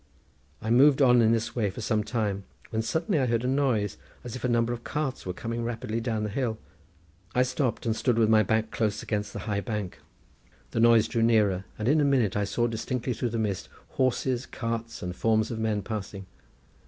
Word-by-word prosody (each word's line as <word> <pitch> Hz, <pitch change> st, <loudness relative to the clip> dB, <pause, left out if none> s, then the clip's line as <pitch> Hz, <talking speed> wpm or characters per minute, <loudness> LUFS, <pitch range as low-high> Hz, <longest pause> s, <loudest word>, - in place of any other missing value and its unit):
I 110 Hz, -, -1 dB
moved 135 Hz, +4 st, +6 dB
on 125 Hz, -3 st, +6 dB
in 110 Hz, -1 st, +4 dB
this 115 Hz, 0 st, -1 dB
way 110 Hz, -5 st, +1 dB
for 95 Hz, -, -8 dB
some 110 Hz, -1 st, 0 dB
time, 105 Hz, -3 st, -2 dB, 0.3 s
when 110 Hz, -, 0 dB
suddenly 160 Hz, +7 st, 0 dB
I 130 Hz, -, +1 dB
heard 115 Hz, 0 st, +1 dB
a -, -, +1 dB
noise, 130 Hz, -7 st, +1 dB, 0.3 s
as 120 Hz, -1 st, -6 dB
if 125 Hz, -, -7 dB
a 125 Hz, -, +1 dB
number 120 Hz, 0 st, +2 dB
of 120 Hz, 0 st, -7 dB
carts 145 Hz, -7 st, -3 dB
were -, -, -1 dB
coming 115 Hz, +4 st, -4 dB
rapidly 115 Hz, -1 st, -3 dB
down 115 Hz, -2 st, -1 dB
the 105 Hz, -, -2 dB
hill. 115 Hz, -2 st, -1 dB, 0.8 s
I 125 Hz, -, +5 dB
stopped, 130 Hz, -2 st, -1 dB
and 110 Hz, -1 st, +1 dB
stood 120 Hz, 0 st, +1 dB
with 115 Hz, -2 st, +4 dB
my 110 Hz, 0 st, +5 dB
back 110 Hz, +1 st, 0 dB
close 105 Hz, -2 st, -1 dB
against 105 Hz, -1 st, -2 dB
the -, -, -6 dB
high 105 Hz, -2 st, -1 dB
bank. 105 Hz, -5 st, -4 dB, 0.7 s
The -, -, -1 dB
noise 115 Hz, -1 st, +6 dB
drew 115 Hz, -, -1 dB
nearer, 105 Hz, -5 st, +3 dB
and 110 Hz, -, -2 dB
in 150 Hz, +3 st, +4 dB
a -, -, +3 dB
minute 130 Hz, -8 st, +2 dB
I 105 Hz, 0 st, +1 dB
saw 120 Hz, +4 st, -1 dB
indistinctly 120 Hz, +2 st, -2 dB
through 120 Hz, +2 st, -2 dB
the 115 Hz, -, -3 dB
mist, 105 Hz, -4 st, -2 dB, 0.2 s
horses, 130 Hz, -1 st, 0 dB
carts, 115 Hz, -3 st, -4 dB
and 90 Hz, 0 st, -4 dB
forms 110 Hz, +1 st, +1 dB
of 115 Hz, -, -4 dB
men 110 Hz, -2 st, 0 dB
passing. 100 Hz, -2 st, -5 dB
115 Hz, 215 wpm, -27 LUFS, 105-125 Hz, 0.8 s, moved